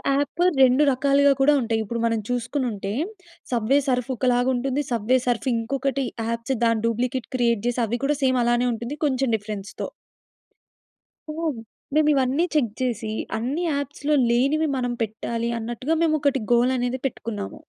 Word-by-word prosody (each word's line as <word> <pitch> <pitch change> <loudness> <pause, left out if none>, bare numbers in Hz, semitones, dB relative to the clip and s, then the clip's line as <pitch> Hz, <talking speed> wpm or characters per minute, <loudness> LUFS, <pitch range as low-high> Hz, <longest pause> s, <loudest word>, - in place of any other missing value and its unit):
App 290 +4 -1 0.2
2 260 +3 +6
రకాలుగా 280 +2 +3
కూడా 290 +2 +5
ఉంటాయి. 225 -1 0
ఇప్పుడు 235 +3 -4
మనం 230 -1 +1
చూసుకునుంటే, 245 -5 -2 0.6
సబ్వే 245 +4 +3
సర్ఫ్ 250 0 0
ఒకలాగుంటుంది. 255 +2 +1
సబ్వే 235 +2 +2
సర్ఫ్ 245 +2 0
ఇంకొకటి 270 +3 -1 0.2
యాప్స్ 230 +3 -2
దాని 230 -1 +2
డూప్లికేట్ 245 +2 -1
క్రియేట్ 235 -4 +1
చేసి 245 0 0
అవి 235 +2 -2
కూడా 295 +1 +1
సేమ్ 260 -1 +3
అలానే 240 +1 +2
ఉంటుంది. 235 +6 -5
కొంచెం 270 -2 +1
డిఫరెన్స్‌తో. 205 -2 -5 1.4
సో, - - -3 0.6
మేమివన్ని 295 0 +3
చెక్ 240 -8 +2
చేసి, 225 -3 -2 0.3
అన్ని 260 +9 -2
యాప్స్‌లో 285 +1 -1 0.2
లేనివి 275 +6 +2
మనం 245 -1 -1
పెట్టాలి 230 +2 -3
అన్నట్టుగా 240 +7 -2
మేమొకటి 290 -5 +2
గోల్ 240 +2 +4
అనేది 245 +1 -1
పెట్టుకున్నాము. 215 -5 -5
250 Hz, 135 wpm, -24 LUFS, 230-275 Hz, 1.4 s, 2